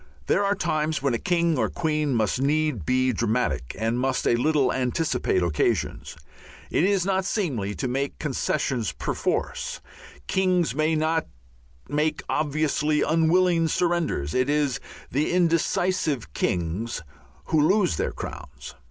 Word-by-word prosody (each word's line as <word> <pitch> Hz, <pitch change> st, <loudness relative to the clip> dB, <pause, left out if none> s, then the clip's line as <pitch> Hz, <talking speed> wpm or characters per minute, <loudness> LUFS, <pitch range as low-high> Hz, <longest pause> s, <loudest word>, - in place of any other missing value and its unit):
There 200 Hz, -, +2 dB
are 200 Hz, 0 st, +2 dB
times 155 Hz, -5 st, -1 dB
when 140 Hz, -3 st, +2 dB
a 115 Hz, -, 0 dB
king 170 Hz, -4 st, +1 dB
or -, -, +1 dB
queen 155 Hz, -5 st, 0 dB
must 110 Hz, +3 st, +1 dB
need 145 Hz, -, 0 dB
be 130 Hz, 0 st, +2 dB
dramatic 115 Hz, -, -1 dB
and 115 Hz, +3 st, 0 dB
must 130 Hz, 0 st, 0 dB
a -, -, +4 dB
little 140 Hz, +1 st, +2 dB
anticipate 125 Hz, -, 0 dB
occasions. 80 Hz, -4 st, -1 dB, 0.6 s
It -, -, +2 dB
is 195 Hz, -2 st, +2 dB
not 190 Hz, -1 st, +1 dB
seemly 135 Hz, -, -2 dB
to 130 Hz, -, -2 dB
make 135 Hz, +3 st, -2 dB
concessions 135 Hz, -, -1 dB
perforce; -, -, -2 dB, 0.5 s
kings 185 Hz, -6 st, +1 dB
may 155 Hz, +3 st, +1 dB
not 160 Hz, +1 st, 0 dB, 0.6 s
make 150 Hz, +2 st, 0 dB
obviously 150 Hz, 0 st, +1 dB
unwilling 165 Hz, +1 st, +3 dB
surrenders; 170 Hz, -, 0 dB
it 130 Hz, +2 st, +1 dB
is 145 Hz, -3 st, +1 dB, 0.3 s
the 145 Hz, +4 st, 0 dB
indecisive 170 Hz, -, +1 dB
kings 90 Hz, +5 st, -2 dB, 0.5 s
who 155 Hz, -, +3 dB
lose 180 Hz, -, +3 dB
their -, -, -1 dB
crowns. 65 Hz, -3 st, -8 dB
150 Hz, 135 wpm, -25 LUFS, 125-165 Hz, 0.6 s, a